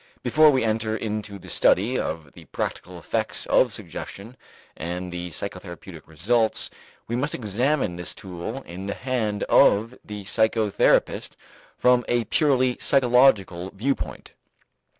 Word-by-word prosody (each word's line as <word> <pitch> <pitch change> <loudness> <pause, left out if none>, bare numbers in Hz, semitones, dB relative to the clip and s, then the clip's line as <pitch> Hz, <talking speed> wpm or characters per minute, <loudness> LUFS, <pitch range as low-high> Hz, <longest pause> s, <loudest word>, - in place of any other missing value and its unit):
Before 155 0 +6
we 130 -4 +2
enter 110 0 0
into 105 -2 -4
the - - -14
study 115 +7 +3
of 80 -3 -4
the - - -14
practical - - -5
effects - - -2
of - - +3
suggestion 110 +6 -8 0.4
and 90 +2 -5
the 90 0 -5
psychotherapeutic 90 -1 -8
results, 110 +9 0 0.4
we 120 - -2
must 140 +4 -1
examine 120 - 0
this 90 - -4
tool 95 +8 -6
in 95 +3 -8
the 100 - -3
hand 110 -6 -2
of 110 +4 +4
the 105 -1 -7
psychotherapist 110 0 +1 0.4
from 125 0 +4
a 120 -1 +1
purely 130 0 +2
psychological 120 -9 +3
viewpoint. 135 +7 -3
110 Hz, 130 wpm, -24 LUFS, 95-125 Hz, 0.4 s, Before